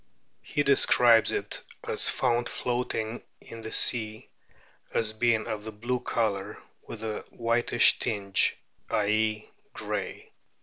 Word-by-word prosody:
He 145 Hz, -, -2 dB
describes 120 Hz, -4 st, +5 dB
it -, -, -2 dB, 0.3 s
as -, -, +4 dB
found 120 Hz, -1 st, 0 dB
floatino 120 Hz, -2 st, -3 dB, 0.2 s
in 115 Hz, -, -11 dB
the 110 Hz, -, -7 dB
o -, -, -7 dB
sea, 110 Hz, -2 st, +2 dB, 0.6 s
as 110 Hz, -1 st, +1 dB
being 115 Hz, 0 st, +1 dB
of 105 Hz, 0 st, -5 dB
a -, -, -5 dB
blue 120 Hz, +4 st, -3 dB
colour 105 Hz, -4 st, -2 dB, 0.3 s
with 110 Hz, -1 st, -8 dB
a 110 Hz, -1 st, -4 dB
whitish 120 Hz, 0 st, +2 dB
tinge, 100 Hz, -3 st, 0 dB, 0.3 s
i.e., 110 Hz, +1 st, 0 dB, 0.2 s
grey. -, -, -5 dB
110 Hz, 125 wpm, -27 LUFS, 110-120 Hz, 0.6 s, describes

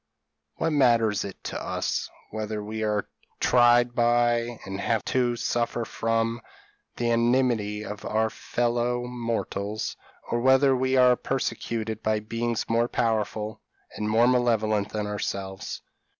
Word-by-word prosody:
"What 165 Hz, 0 st, 0 dB
matters 115 Hz, -7 st, +3 dB
it 100 Hz, -, -8 dB
to -, -, -4 dB
us, -, -, -2 dB, 0.2 s
whether 110 Hz, -1 st, -4 dB
we 110 Hz, +1 st, -5 dB
are 105 Hz, -2 st, 0 dB, 0.3 s
tried 120 Hz, 0 st, +4 dB
by, 120 Hz, 0 st, +2 dB
and 95 Hz, 0 st, -5 dB
have 115 Hz, 0 st, 0 dB
to 125 Hz, -2 st, +1 dB
suffer 120 Hz, 0 st, -1 dB
from, 115 Hz, +2 st, -1 dB, 0.5 s
the 120 Hz, -1 st, 0 dB
enmity 115 Hz, -3 st, +1 dB
of 105 Hz, 0 st, -7 dB
our 110 Hz, +1 st, 0 dB
fellow 120 Hz, 0 st, -1 dB
mortals, 115 Hz, -3 st, -3 dB, 0.4 s
or 120 Hz, -, +1 dB
whether 130 Hz, +1 st, +5 dB
we 130 Hz, +1 st, +1 dB
are 125 Hz, -1 st, +6 dB
persecuted 115 Hz, -4 st, -3 dB
by 110 Hz, 0 st, +1 dB
beings 115 Hz, +2 st, -2 dB
more 115 Hz, +1 st, +2 dB
powerful 110 Hz, -2 st, -1 dB, 0.3 s
and 105 Hz, 0 st, -2 dB
more 115 Hz, +2 st, +4 dB
malevolent 110 Hz, -4 st, +2 dB
than 105 Hz, -1 st, -3 dB
ourselves? 100 Hz, -2 st, -4 dB
115 Hz, 130 wpm, -26 LUFS, 110-120 Hz, 0.5 s, are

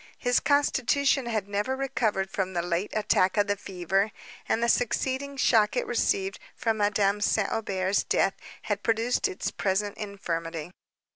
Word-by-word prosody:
His 245 Hz, -1 st, +2 dB
constitution 280 Hz, -2 st, +2 dB
had 215 Hz, -4 st, -1 dB
never 205 Hz, +6 st, -1 dB
recovered 225 Hz, -8 st, -1 dB
from 190 Hz, -1 st, -2 dB
the 170 Hz, -1 st, -1 dB
late 175 Hz, +3 st, -1 dB
attack 200 Hz, -2 st, +2 dB
of 205 Hz, -, +4 dB
the 205 Hz, -1 st, 0 dB
fever, 195 Hz, +1 st, -1 dB, 0.4 s
and 230 Hz, -, +1 dB
the -, -, +3 dB
succeeding 265 Hz, +4 st, 0 dB
shock 220 Hz, -5 st, +3 dB
it -, -, 0 dB
received 195 Hz, -4 st, 0 dB, 0.2 s
from 225 Hz, -2 st, 0 dB
Madame 205 Hz, -1 st, +2 dB
St. 210 Hz, -1 st, +1 dB
Aubert's 195 Hz, -3 st, 0 dB
death 195 Hz, -, +2 dB, 0.3 s
had 205 Hz, -2 st, -2 dB
produced 225 Hz, +3 st, +1 dB
its 185 Hz, -, -4 dB
present 200 Hz, +1 st, -1 dB
infirmity. 170 Hz, -5 st, -4 dB
205 Hz, 150 wpm, -27 LUFS, 190-235 Hz, 0.4 s, of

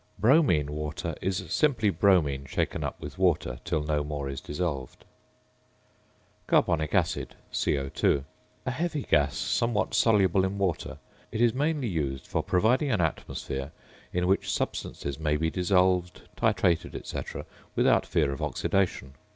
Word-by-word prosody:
~"Bromine 105 Hz, -, +4 dB
Water"~ 75 Hz, 0 st, -4 dB
is 95 Hz, -1 st, -1 dB
simply 125 Hz, -9 st, +2 dB
bromine 75 Hz, -10 st, +2 dB
shaken -, -, -1 dB
up -, -, -4 dB
with -, -, -8 dB
water 85 Hz, -9 st, +1 dB
till 75 Hz, -, -1 dB
no 75 Hz, -1 st, 0 dB
more 75 Hz, -1 st, -4 dB
is 70 Hz, -1 st, -5 dB
dissolved. 75 Hz, -6 st, -4 dB, 1.4 s
~Carbonic 80 Hz, 0 st, +2 dB
Acid~, 90 Hz, -4 st, 0 dB, 0.2 s
CO_. 70 Hz, 0 st, +1 dB, 0.4 s
A 125 Hz, -, 0 dB
heavy 155 Hz, +2 st, -2 dB
gas, 70 Hz, -3 st, +2 dB
somewhat 115 Hz, -2 st, 0 dB
soluble 100 Hz, -5 st, +4 dB
in 95 Hz, +1 st, -1 dB
water; 95 Hz, -5 st, -1 dB, 0.3 s
it 110 Hz, -, -3 dB
is 120 Hz, -1 st, +4 dB
mainly 145 Hz, -1 st, 0 dB
used 70 Hz, -, -2 dB
for -, -, -1 dB
providing 120 Hz, +10 st, +2 dB
an 105 Hz, -, +1 dB
atmosphere 70 Hz, -4 st, -3 dB, 0.4 s
in 90 Hz, 0 st, 0 dB
which 95 Hz, +2 st, +1 dB
substances 70 Hz, 0 st, -3 dB
may 75 Hz, -1 st, +1 dB
be 80 Hz, +1 st, 0 dB
dissolved, 90 Hz, 0 st, +1 dB
titrated, 85 Hz, -2 st, +1 dB
&c., -, -, -4 dB, 0.6 s
without -, -, +4 dB
fear 75 Hz, -4 st, +1 dB
of 70 Hz, -, -5 dB
oxidation. 90 Hz, -9 st, -1 dB
90 Hz, 135 wpm, -28 LUFS, 75-100 Hz, 1.4 s, ~"Bromine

